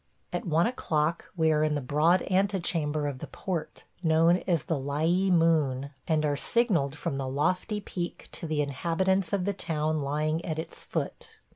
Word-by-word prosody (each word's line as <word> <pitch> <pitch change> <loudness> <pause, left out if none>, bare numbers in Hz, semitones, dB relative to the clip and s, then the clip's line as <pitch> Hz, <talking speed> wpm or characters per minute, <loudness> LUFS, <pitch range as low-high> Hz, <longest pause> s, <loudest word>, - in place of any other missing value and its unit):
At 210 - -3
one 165 +1 +3
o'clock 165 -9 -1
we 160 -1 +4
are 155 0 +3
in 155 -1 +1
the - - 0
broad 150 +7 +3
antechamber 175 -6 0
of 140 -3 -3
the - - -6
port, 180 -5 -5 0.2
known 165 +1 +4
as 170 -6 +2
the 160 -4 -1
Lyee 160 +8 +1
Moon, 155 -6 +2 0.2
and 155 -2 +2
are 145 -1 +1
signalled 170 - +1
from 140 -2 -3
the 135 - -2
lofty 180 - 0
peak 175 -3 -5
to 165 - -5
the 155 -1 +1
inhabitants 170 +6 0
of 195 -3 0
the 200 - 0
town 155 -3 -1
lying 155 +3 -1
at 160 -2 -3
its 160 - -6
foot. - - -5
160 Hz, 175 wpm, -28 LUFS, 150-180 Hz, 0.2 s, we